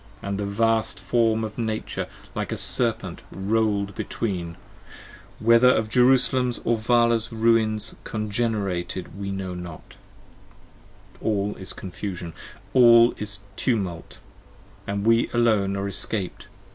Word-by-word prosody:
80 - - -7
And 100 - -2
the 100 - -1
vast 110 -1 0
form 110 +3 +1
of 110 +1 -6
Nature 110 -1 -3 0.3
like - - -3
a - - -2
serpent - - +1
roll'd 100 0 0
between, 90 -5 -4 0.8
Whether 115 +2 +5
of 110 -3 +2
Jerusalem's 125 0 +3
or 120 - +3
Vala's 115 0 +2
ruins 110 -1 +2
congenerated 100 -5 -2
we 100 -1 -4
know 95 -1 -4
not: 90 -3 -9 1.2
All 105 -1 0
is 95 -1 -7
confusion: 90 -2 -6 0.4
all 120 -2 +7
is 100 -1 -4
tumult, 95 -10 -2 0.4
& - - -26
we 110 +4 +2
alone 105 -5 +2
are 100 0 -2
escaped. 100 -1 -2
110 Hz, 120 wpm, -24 LUFS, 100-115 Hz, 1.2 s, all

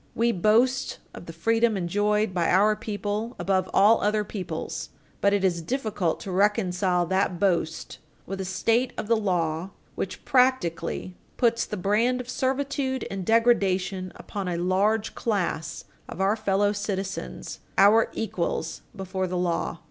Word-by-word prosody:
We 235 +1 +2
boast 230 +7 +2 0.2
of - - -10
the - - -6
freedom 225 +6 +1
enjoyed 205 +3 +1
by 175 -2 +1
our 210 +4 +4
people 210 +2 -4
above 190 -1 0
all 210 +3 +5
other 210 +1 +1
peoples. 200 -2 -5 0.3
But 200 - +4
it 200 -1 +1
is 175 -3 +1
difficult 215 -5 -1
to 195 - -6
reconcile 185 -2 +2
that 190 -1 0
boast 170 -4 -1 0.3
with 195 +1 -5
a - - -4
state 230 +7 +1
of - - -3
the 230 - +4
law 175 -4 -1 0.2
which, 190 - -5
practically, 250 -9 +1 0.2
puts 230 -1 +2
the - - -5
brand 220 +7 +1
of 250 0 -6
servitude 265 0 -1
and 195 -1 -3
degradation 195 -4 +2
upon 200 -2 -6
a 175 -1 -1
large 200 +5 +1
class 175 -7 -2 0.2
of - - -8
our 195 +2 +3
fellow 205 -2 +1
citizens, 195 - -4 0.2
our 210 +4 +6
equals 170 -6 -3
before 190 -1 -3
the 180 0 -3
law. 175 -1 -1
200 Hz, 150 wpm, -26 LUFS, 185-225 Hz, 0.3 s, our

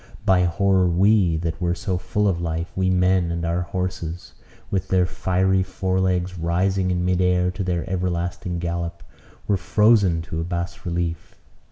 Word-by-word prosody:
By 95 -3 +4
horror 95 +1 +2
we, 90 -1 +3
that 85 +1 -4
were 85 0 +1
so 90 +1 -2
full 100 +3 0
of 85 -3 0
life, 85 0 -3
we 95 0 +1
men 90 -1 +2
and 85 0 -2
our 85 +1 0
horses, 90 -1 -4 0.4
with 95 -1 -1
their 95 -1 +3
fiery 95 +1 +1
fore 95 0 -1
legs 90 -1 0
rising 90 +3 +1
in 90 -1 0
mid 90 0 +1
air 90 0 +2
to 95 +2 -4
their 90 -1 -2
everlasting 90 0 -2
gallop, 85 0 -4 0.4
were 100 - +2
frozen 100 -3 +3
to 80 0 -4
a - - -2
bas 85 +2 -4
relief. 85 -1 -3
90 Hz, 170 wpm, -23 LUFS, 85-95 Hz, 0.4 s, By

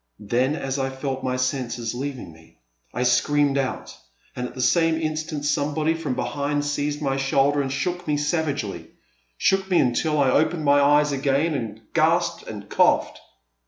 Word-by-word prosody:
Then, 125 +7 0
as 135 -2 -3
I 135 0 0
felt 135 0 -4
my 130 0 -1
senses 125 -3 -2
leaving 130 - -5
me, 80 0 -20 0.3
I 125 - -2
screamed 140 +3 +2
out, 130 -1 -4 0.4
and 125 0 -3
at - - -13
the - - -8
same 165 +5 +3
instant 155 -1 -3
somebody 150 +2 +1
from 160 -6 -3
be - - -1
hind 145 0 -2
seized 145 +1 -2
my 135 -1 0
shoulder 135 +1 +2
and 135 -1 -3
shook 175 +6 -3
me 150 -1 +1
savagely 145 - -2 0.3
— - - -40
shook 190 - +1
me 180 - +3
until 150 +4 +1
I 135 -2 +3
opened 155 +2 +1
my 145 0 +5
eyes 145 +1 +4
again 140 +3 +1
and 115 -5 -4
gasped 170 +2 +1
and 105 -2 -8
coughed. - - +2
140 Hz, 175 wpm, -23 LUFS, 130-150 Hz, 0.4 s, my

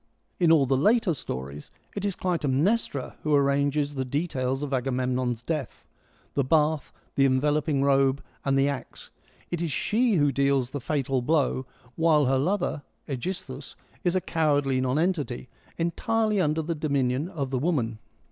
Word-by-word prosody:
In 170 -3 +4
all 155 -4 +5
the 135 +1 +2
later 210 - +3
stories 70 - -6 0.3
it 200 - -3
is 200 -2 -1
Clytemnestra 165 - 0
who 150 -1 +2
arranges 140 +1 +2
the 130 -2 -2
details 135 -1 -2
of 140 -1 -3
Agamemnon's 125 -2 -1
death 150 -5 -4 0.2
— - - -35
the 140 - +1
bath, 150 +1 +1 0.2
the 135 - +3
enveloping 145 +1 +1
robe, 135 0 +3 0.2
and 135 -1 +1
the 135 +1 +3
axe; 140 -2 -6 0.4
it 175 -1 -2
is 170 -3 -1
she 225 - +1
who 145 -4 +3
deals 140 -2 +1
the 145 - -4
fatal 135 -1 0
blow, 130 -2 +1 0.3
while 160 -3 +4
her 130 +1 +2
lover, 175 -1 0 0.3
^gisthus, 140 -1 -5 0.3
is 175 0 +1
a 185 - +2
cowardly 145 -6 +1
nonentity, 140 -2 -1 0.3
entirely 215 +5 +1
under 155 -1 +1
the 165 +2 -2
dominion 140 -1 0
of 140 -8 -4
the 130 - 0
woman. 125 -8 0
140 Hz, 155 wpm, -26 LUFS, 130-165 Hz, 0.4 s, all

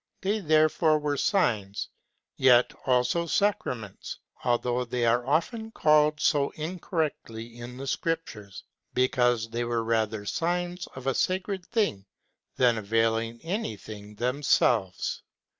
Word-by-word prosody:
They 205 +3 0
therefore 155 -2 +3
were 150 -1 -1
signs, 110 - 0 0.5
yet 125 -2 +5
also 130 +7 +2
sacraments, 125 - -1 0.3
although 120 +1 +1
they 120 0 -1
are 120 +2 +2
often 220 - 0
called 150 -5 +3
so 145 -2 +2
incorrectly 150 - -4
in 120 +1 -8
the 135 - -6
Scriptures, 135 - -3 0.3
because 120 -3 +2
they 120 +1 -1
were 120 -1 -1
rather 110 -2 0
signs 175 - -2
of 130 -1 -9
a 135 - +2
sacred 185 +4 -1
thing 200 - 0 0.5
than 120 -3 +4
availing 115 +2 0
anything 105 - -5
themselves. 120 -5 +1
125 Hz, 115 wpm, -27 LUFS, 115-165 Hz, 0.5 s, yet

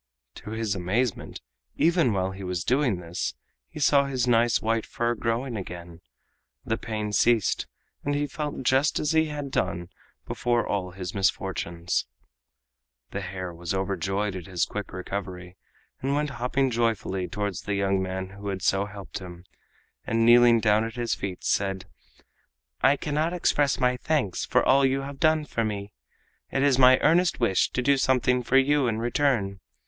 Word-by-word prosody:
To - - -10
his 110 -2 -2
amazement, 100 +5 -2 0.4
even 165 -6 +3
while 95 -2 0
he 95 +1 -8
was 90 -2 -3
doing 125 -4 +1
this, 85 0 -4 0.3
he - - -9
saw 140 -1 +4
his 130 -3 -1
nice 120 -1 +3
white 115 0 0
fur 120 0 -1
growing 120 +2 -2
again, 85 -3 -8 0.6
the 110 - 0
pain 105 -2 -4
ceased, 115 -1 +2 0.4
and 145 0 -1
he 145 0 0
felt 145 -2 -5
just 130 +4 +2
as 150 - 0
he 160 0 +3
had 145 -3 -5
done 90 -5 -2 0.4
before 120 -1 0
all 95 -3 -2
his 90 0 -6
misfortunes. 90 -3 -1 1.0
The 100 - -4
hare 95 -1 -5
was 85 +2 -4
overjoyed 95 +1 -1
at 90 -3 -7
his 90 -3 0
quick 105 -2 -6
recovery, 90 -1 -6 0.5
and 135 +2 0
went 150 0 -1
hopping 130 +1 0
joyfully 110 -5 -1
towards 100 0 -3
the 100 - -2
young 100 -1 +1
man 95 0 -4
who 100 +1 -9
had 95 -2 -3
so 100 +1 +2
helped 105 -1 -8
him, 90 -2 -10 0.6
and 115 0 +2
kneeling 120 0 +7
down 110 -1 +3
at 115 +1 -5
his 120 -1 -1
feet, 95 -2 -5
said: 95 -1 0 1.0
"I 140 +2 +4
cannot 155 +4 -1
express 145 -5 +1
my 125 -1 +2
thanks 130 - -1
for - - +2
all 140 +1 +5
you 135 0 +2
have 140 0 -8
done 155 -1 +3
for 115 -5 -2
me! 100 -1 -4 0.6
It 135 - 0
is 135 -2 +3
my 130 0 +8
earnest 170 +2 +3
wish 95 -7 +2
to 125 - -1
do 140 +2 +4
something 125 -1 +2
for 125 +2 +2
you 140 0 +3
in 110 -2 0
return. 115 -5 0
115 Hz, 170 wpm, -26 LUFS, 95-135 Hz, 1.0 s, my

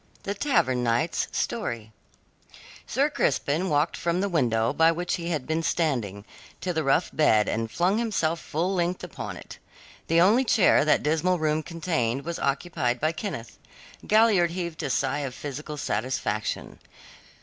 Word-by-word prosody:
THE 200 - -2
TAVERN 170 - +1
KNIGHT'S 120 +7 0
STORY 115 - -3 1.0
Sir - - +2
Crispin 165 +7 0
walked 150 +2 +1
from 170 +1 -1
the 200 +1 0
window 115 -9 +1
by 165 0 +5
which 175 +2 -2
he 170 -2 -3
had 150 -6 -2
been 160 +1 -1
standing, 120 - -1 0.3
to 180 - -2
the 160 -1 0
rough 135 +5 +2
bed, 110 -9 +3
and 115 0 -1
flung 185 - +1
himself 170 -8 0
full 170 +6 -2
length 180 0 -1
upon - - -6
it. - - -11 0.5
The 165 +1 +3
only 210 +9 +5
chair 220 - +4
that 155 - +3
dismal 165 +4 +1
room 155 -1 0
contained 150 -6 -2
was 170 0 -4
occupied 135 -4 -1
by 155 +1 +1
Kenneth. 155 - -6 0.5
Galliard 215 -5 +4
heaved 170 -2 -4
a - - -3
sigh 135 +2 0
of 135 -3 -4
physical 150 +1 -6
satisfaction. 110 -3 -2
160 Hz, 155 wpm, -26 LUFS, 130-175 Hz, 1.0 s, by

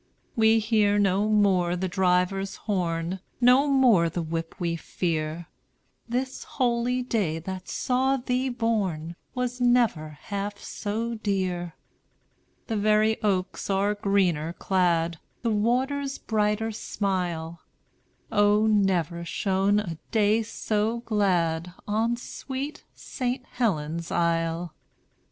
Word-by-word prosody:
"We 225 0 +5
hear 215 -2 +2
no 200 +1 +2
more 190 -5 +3
the 185 +1 -2
driver's 190 +1 +1
horn, 175 -3 -2 0.2
No 255 +3 +5
more 245 -12 +4
the 170 +1 -3
whip 165 +1 -4
we 170 -2 -1
fear; 165 -1 -3 0.6
This 255 +2 -2
holy 250 -1 0
day 205 -10 0
that 185 +3 -6
saw 265 +2 +1
thee 255 +1 -1
born 200 -9 -1 0.2
Was 250 0 -2
never 230 -12 +2
half 200 0 -4
so 225 +4 -3
dear. 185 -6 -2 0.9
"The 225 - -2
very 215 +1 +3
oaks 190 -3 -1
are 200 +1 +2
greener 185 -6 +1
clad, 170 -3 +1 0.2
The 230 - +1
waters 265 +6 0
brighter 215 0 0
smile; 175 -6 -3 0.7
O, 205 0 +4
never 185 -5 +1
shone 195 +3 +1
a 170 -6 -5
day 215 0 +3
so 220 +1 -1
glad 180 -6 0
On 225 +3 +1
sweet 270 +4 -6
St. 255 0 -3
Helen's 170 -8 -2
Isle. 165 0 0
205 Hz, 110 wpm, -26 LUFS, 175-230 Hz, 0.9 s, We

